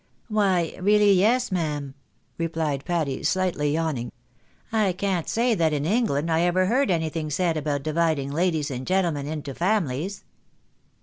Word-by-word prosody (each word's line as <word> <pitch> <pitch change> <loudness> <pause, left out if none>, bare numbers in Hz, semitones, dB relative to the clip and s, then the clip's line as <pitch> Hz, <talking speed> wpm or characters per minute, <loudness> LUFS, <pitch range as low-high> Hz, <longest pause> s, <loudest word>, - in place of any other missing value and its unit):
" - - -40
Why, 190 -6 +1
really 205 +1 +5
yes, 225 +6 +2
ma'am," 150 -6 -2 0.5
replied 160 -4 -2
Patty, 160 -6 -1
slightly 180 -6 0
yawning, 155 -6 -1
■" - - -10 0.6
I 205 -4 +2
can't 185 -2 -2
say 235 +1 +2
that 165 -6 +1
in 145 0 -1
England 170 - +1
I 160 +1 +2
ever 175 +2 +2
heard 250 +5 +2
anything 160 -2 -1
said 165 +3 0
about 145 -2 -2
dividing 155 -3 0
ladies 160 -2 0
and 130 0 -5
gentlemen 170 -7 0
into 150 -2 -5
families." 180 -1 -1
165 Hz, 150 wpm, -25 LUFS, 150-190 Hz, 0.6 s, really